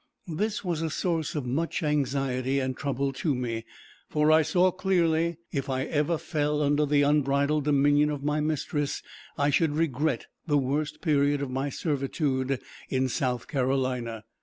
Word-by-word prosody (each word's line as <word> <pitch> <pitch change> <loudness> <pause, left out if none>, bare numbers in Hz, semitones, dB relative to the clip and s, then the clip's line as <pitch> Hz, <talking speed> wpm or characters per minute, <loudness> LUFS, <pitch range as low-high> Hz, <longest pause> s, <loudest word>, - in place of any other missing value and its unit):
This 210 +4 -2
was 170 -3 -1
a 165 - -1
source 165 -1 -1
of 145 -4 -2
much 160 +8 -1
anxiety 135 -2 0
and 130 -1 -2
trouble 140 0 -1
to 135 +2 0
me, 115 -2 -3 0.4
for 150 0 +3
I 160 0 +6
saw 175 +4 +3
clearly, 170 -3 +1
if 140 -2 -2
I 130 0 0
ever 150 +3 0
fell 150 -1 -1
under 145 +1 +2
the 145 0 +3
unbridled 145 0 +2
dominion 145 0 +4
of 145 -2 -4
my 150 +1 +1
mistress, 150 -1 -1 0.3
I 145 +1 +2
should 150 +1 +2
regret 155 -1 0 0.2
the 145 -2 +3
worst 145 +3 -1
period 145 -3 +2
of 135 - -4
my 135 +2 -1
servitude 135 -3 -1 0.3
in 130 0 +1
South 125 -1 -1
Carolina. 130 -5 -1
145 Hz, 160 wpm, -27 LUFS, 135-155 Hz, 0.4 s, I